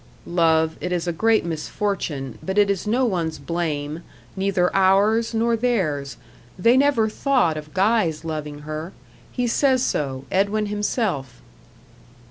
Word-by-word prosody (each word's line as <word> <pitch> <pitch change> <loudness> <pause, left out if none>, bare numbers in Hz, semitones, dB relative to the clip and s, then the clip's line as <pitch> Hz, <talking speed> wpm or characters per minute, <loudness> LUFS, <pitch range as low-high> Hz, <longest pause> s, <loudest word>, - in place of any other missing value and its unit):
"Love, 160 -2 +2
it 180 - -3
is 175 -1 -1
a 175 - 0
great 220 +4 +2
misfortune, 160 - -3
but 190 +1 -4
it 205 -1 +4
is 200 +1 -3
no 250 +4 +2
one's 170 -7 -1
blame 155 0 -3 0.3
neither 190 -2 0
ours, 200 +4 +3
nor 230 +1 +2
theirs 155 - -1 0.4
they 230 +7 +4
never 265 -5 +3
thought 230 - +1
of 155 0 -8
Guy's 190 -6 +1
loving 150 -2 -5
her. 155 +4 -6 0.4
He 250 - -1
says 260 +1 +2
so 135 - -2
Edwin 200 +3 +1
himself." 205 - -2
185 Hz, 135 wpm, -22 LUFS, 155-220 Hz, 0.4 s, it